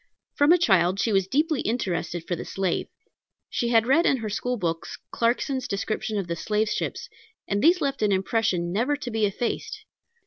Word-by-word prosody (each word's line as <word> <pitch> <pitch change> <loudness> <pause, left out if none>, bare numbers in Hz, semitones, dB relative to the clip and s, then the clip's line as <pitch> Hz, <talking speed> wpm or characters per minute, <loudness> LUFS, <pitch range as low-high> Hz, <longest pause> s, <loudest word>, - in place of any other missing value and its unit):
From 290 +2 +4
a 355 - +7
child 190 - +3
she 225 - +1
was 195 -1 +2
deeply 300 - +1
interested 175 -6 -2
for 175 - -1
the - - -6
slave. 190 -3 -2 0.6
She 240 - -1
had 225 -1 +4
read 310 +8 +4
in 270 - +3
her 220 -3 -4
school 245 +4 -2
books 165 -4 -3
Clarkson's 250 +2 0
description 215 +2 -2
of 195 - -1
the 170 0 -3
slave 210 +5 0
ships, - - -3 0.4
and 200 0 0
these 345 +3 +5
left 275 -1 -1
an 210 -1 +2
impression 190 -3 0
never 245 +8 +1
to 260 -4 -6
be 220 -2 +2
effaced. 230 +4 -4
220 Hz, 185 wpm, -25 LUFS, 190-255 Hz, 0.6 s, a